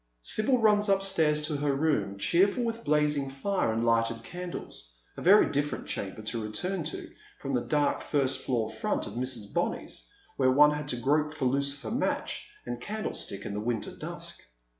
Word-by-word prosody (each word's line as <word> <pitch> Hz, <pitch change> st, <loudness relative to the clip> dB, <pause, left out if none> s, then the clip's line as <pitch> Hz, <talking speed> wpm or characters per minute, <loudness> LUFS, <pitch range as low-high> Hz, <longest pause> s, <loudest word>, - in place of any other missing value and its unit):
Sibyl 215 Hz, -, +2 dB
runs 210 Hz, -2 st, +4 dB
upstairs 170 Hz, -6 st, +2 dB
to 155 Hz, -1 st, -1 dB
her 140 Hz, -1 st, +1 dB
room, 140 Hz, -9 st, 0 dB
cheerful 195 Hz, -, +3 dB
with 230 Hz, 0 st, -3 dB
blazing 150 Hz, -2 st, +2 dB
fire 140 Hz, -, 0 dB
and 115 Hz, +1 st, 0 dB
lighted 115 Hz, 0 st, +2 dB
candles 175 Hz, -, -7 dB
— -, -, -36 dB
a -, -, -7 dB
very 200 Hz, +4 st, +7 dB
different 145 Hz, +1 st, -1 dB
chamber 100 Hz, +2 st, -4 dB
to 115 Hz, +1 st, -3 dB
return 165 Hz, -, -3 dB
to 155 Hz, -, -5 dB, 0.3 s
from 140 Hz, -1 st, -4 dB
that 125 Hz, -2 st, 0 dB
dark 150 Hz, -1 st, +2 dB
first 135 Hz, -3 st, 0 dB
floor 120 Hz, -5 st, 0 dB
front 110 Hz, 0 st, -2 dB
of -, -, -7 dB
Mrs. 120 Hz, -4 st, -3 dB
Benny's, -, -, -2 dB, 0.3 s
where 130 Hz, -1 st, +4 dB
one 150 Hz, +3 st, +6 dB
had 150 Hz, -1 st, -3 dB
to 135 Hz, -, -1 dB
grope 150 Hz, +5 st, +1 dB
for 140 Hz, -, -2 dB
lucifer 140 Hz, -2 st, 0 dB
match -, -, -1 dB, 0.2 s
and 120 Hz, 0 st, -5 dB
candlestick 210 Hz, -, -4 dB
in -, -, -4 dB
the 105 Hz, -, -2 dB
winter 115 Hz, -1 st, -2 dB
dusk. -, -, -7 dB
140 Hz, 180 wpm, -29 LUFS, 115-165 Hz, 0.3 s, very